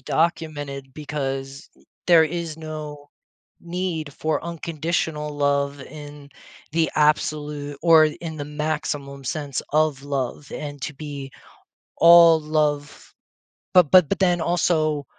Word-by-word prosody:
documented 145 -3 -2
because 140 -1 -5 0.4
there 170 -2 +7
is 165 0 -4
no 150 -2 -8 0.5
need 170 -4 -4
for 155 +1 -2
unconditional 160 -2 -3
love 140 -1 0
in 145 0 -11 0.4
the 160 0 +1
absolute 150 -1 0
or 160 -2 +7 0.2
in 160 -2 -6
the 145 - -5
maximum 150 -2 -4
sense 140 -1 -3
of 155 -3 +1
love 140 0 -4
and 145 -2 -6
to 145 - -4
be 140 -2 -7 0.7
all 170 -1 +8
love 150 -1 -2 0.6
but 180 -6 +6
but 180 -5 +7
but 200 - -1
then 175 -3 +2
also 155 -3 +1
150 Hz, 115 wpm, -23 LUFS, 145-160 Hz, 0.7 s, all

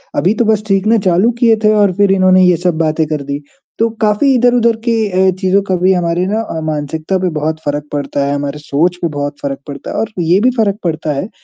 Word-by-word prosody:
अभी 185 +5 +2
तो 235 - +1
बस 215 -1 +1
सीखना 205 +3 +2
चालू 185 +7 +3
किए 230 -2 +4
थे 215 0 +4
और 205 -3 +3
फिर 200 -1 +3
इन्होंने 185 -1 +4
ये 180 -1 +3
सब 175 -1 -1
बातें 160 0 0
कर 150 -1 -3
दी। 140 +1 -3 0.4
तो 230 +1 +2
काफ़ी 215 +6 +2
इधर-उधर 245 -1 +3
के 235 - +2 0.4
अ, - - +3
चीज़ों 190 +1 +2
का 185 - +2
भी 185 +2 +2
हमारे 175 0 0
ना 215 +3 -1
अ, 165 -7 -5
मानसिकता 155 +4 -2
पे 185 0 0
बहुत 155 +1 -2
फ़र्क 145 0 -2
पड़ता 145 -1 -2
है, 140 - -1
हमारे 145 +1 -4
सोच 155 +4 0
पे 170 - +1
बहुत 145 0 -4
फ़र्क 140 -1 -4
पड़ता 140 -1 -7
है - - -6
और 225 0 -2
ये 170 +3 +3
भी 250 - +4
फ़र्क 205 -3 +1
पड़ता 160 -3 -2
है, 145 +9 -4
180 Hz, 235 wpm, -14 LUFS, 155-210 Hz, 0.4 s, किए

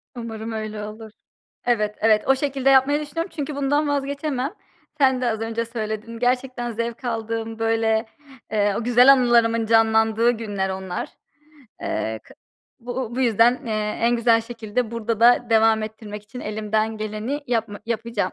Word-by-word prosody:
Umarım 225 -1 -6
öyle 215 -1 -5
olur. 215 +1 -9 0.5
Evet, 210 -3 +1
evet 215 -1 +3
o 270 - +5
şekilde 270 -1 0
yapmayı 270 +2 +4
düşünüyorum. 330 +5 -4
Çünkü 295 -2 -4
bundan 290 +2 +1
vazgeçemem. 280 0 -2 0.4
Sen 265 -3 +3
de 245 - +1
az 220 -1 -3
önce 225 +1 -2
söyledin. 225 0 -5
Gerçekten 250 0 -1
zevk 230 +2 -4
aldığım, 225 -1 -3
böyle, 225 0 +1 0.5
eee, 205 -2 +1
o - - -3
güzel 245 +3 +7
anılarımın 235 -3 +3
canlandığı 225 +1 +3
günler 205 -5 -3
onlar. 190 -1 -4 0.7
Eee, 110 0 -3
kı - - -17 0.5
bu 245 0 -5
bu - - 0
yüzden, 240 +2 +3
eee, 225 - -2 0.3
en 235 +1 +3
güzel 230 -1 +4
şekilde 230 0 -3
burada 230 -1 -3
da 240 0 +5
devam 220 -1 +4
ettirmek 215 -1 -7
için 225 +4 -10
elimden 215 +1 -1
geleni 215 +7 -4
yapma 225 -4 -2
yapacağım. 225 -4 -2
230 Hz, 150 wpm, -23 LUFS, 220-250 Hz, 0.7 s, güzel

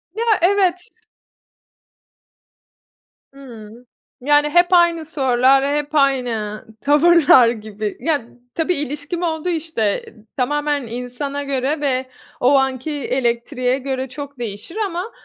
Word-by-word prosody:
Ya, 460 - -2 0.2
evet. 370 +2 +2 2.4
Hıı. 240 -3 -13 0.4
Yani, 295 +2 +3
hep 350 +3 +4
aynı 340 -2 +4
sorular, 270 -1 +2
hep 295 +1 -3
aynı 245 -7 0 0.2
tavırlar 295 -4 +5
gibi. 215 -2 -5
Ya, 285 -2 -1 0.3
tabii 335 +2 0
ilişkim 295 +4 -4
oldu, 320 +1 -2
işte, 320 -6 -3 0.3
eee, - - -15 0.2
tamamen 290 0 -1
insana 250 +4 -5
göre 280 +2 -2
ve 260 -2 -1 0.3
o 270 +3 +4
anki 265 +2 -1
elektriğe 255 -1 -1
göre 265 -1 -4
çok 280 -1 -9
değişir 215 - -7
ama 370 +4 -5
275 Hz, 110 wpm, -19 LUFS, 250-310 Hz, 2.4 s, tavırlar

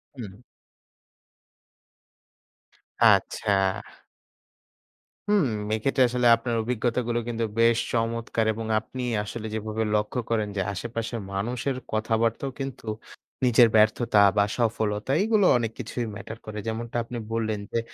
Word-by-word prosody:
হুম। 105 -6 -8 2.7
আচ্ছা। 105 - +3 1.8
হুম। 205 -6 +4 0.3
এক্ষেত্রে 130 +4 +2
আসলে 125 0 +2
আপনার 115 0 -3
অভিজ্ঞতাগুলো 120 0 -1
কিন্তু 115 -1 -2 0.2
বেশ 115 0 +5 0.2
চমৎকার! 115 -1 -1
এবং 110 +1 -5
আপনি 125 +3 -8 0.2
আসলে 110 +1 -6
যেভাবে 110 0 -2
লক্ষ্য 105 +4 -1
করেন 110 -2 +1
যে 95 - 0
আশেপাশের 115 +3 -4
মানুষের 120 +7 -2 0.2
কথাবার্তাও 115 +4 0
কিন্তু 135 -3 -6 0.6
নিজের 120 -1 +6
ব্যর্থতা 110 +1 +4 0.2
বা 100 - +5
সফলতা 110 0 -1
এগুলো 215 -3 +3
অনেক 115 -2 -2
কিছুই 120 0 -3
ম্যাটার 110 +2 -8
করে। 110 0 -7
যেমনটা 115 +1 -4
আপনি 120 +1 -7 0.2
বললেন 110 -2 -1
যে 115 - +1
115 Hz, 115 wpm, -26 LUFS, 110-120 Hz, 2.7 s, নিজের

